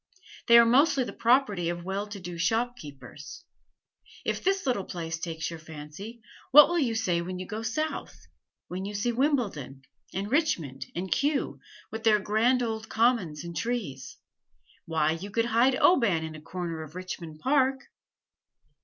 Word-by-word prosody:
They 235 - +8
are 235 - +8
mostly 270 +3 +4
the - - -6
property 225 -8 +2
of 175 0 -4
well 195 +2 -3
to 205 -1 -8
do 175 -2 -7
shopkeepers. 190 - -3 0.8
If - - -2
this 390 -2 +1
little 245 -8 0
place 165 -2 -5
takes 165 -1 -4
your 165 - -7
fancy, 160 +9 -10 0.3
what 295 +3 +9
will 345 0 +1
you 240 -7 0
say 180 -6 +1
when 180 +1 -5
you 185 - -5
go 215 +3 -5
South 310 +8 -4 0.4
when 185 +1 -5
you 205 +1 -5
see 230 +4 0
Wimbledon 225 - -1 0.3
and 200 +3 -4
Richmond 170 - 0
and 180 +1 -4
Kew, 280 - 0 0.3
with 220 0 -6
their 220 -2 +5
grand 225 +5 +2
old 220 -1 -4
commons 220 -10 +1
and 170 0 -7
trees? 190 - -4 0.7
Why, 160 -1 +1
you 170 +5 -5
could 230 +3 0
hide 240 +3 +3
Oban 230 - +4
in 160 0 -6
a 155 - -10
corner 170 -1 -5
of 155 +1 -10
Richmond 175 -4 -7
Park!" 265 - +2
205 Hz, 160 wpm, -28 LUFS, 165-245 Hz, 0.8 s, what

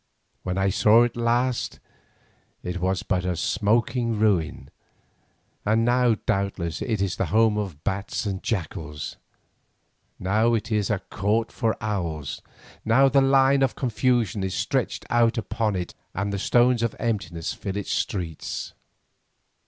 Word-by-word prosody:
When 90 0 -3
I 95 0 +2
saw 110 +3 +5
it 120 - -1
last 120 +1 0 0.8
it 90 0 -3
was 95 +2 0
but 95 -3 0
a 90 -1 -1
smoking 115 +6 +1
ruin, 90 -10 0 0.9
and 110 +2 +2
now 120 -1 +3
doubtless 95 -4 -1
it 110 -5 0
is 95 -2 -2
the 95 - 0
home 110 +5 +3
of 95 -8 -4
bats 100 +3 -2
and 95 -2 -3
jackals; 80 -7 -4 1.0
now 110 +5 +2
it 115 +1 -3
is 105 -2 +1
"a 105 - +2
court 110 +3 0
for 110 -1 -1
owls," 85 -10 -3 0.4
now 135 +5 +5
"the 135 +1 +4
line 135 0 +4
of 135 -2 +2
confusion 120 -4 0
is 95 -1 -2
stretched - - -1
out 120 0 +3
upon 110 -1 -1
it 90 -1 -4 0.2
and 100 +2 -2
the 100 - -2
stones 120 +3 +3
of 115 -1 -1
emptiness 100 -8 -2
fill 100 0 -5
its 100 - -4
streets." 85 -6 -3
105 Hz, 145 wpm, -25 LUFS, 95-115 Hz, 1.0 s, saw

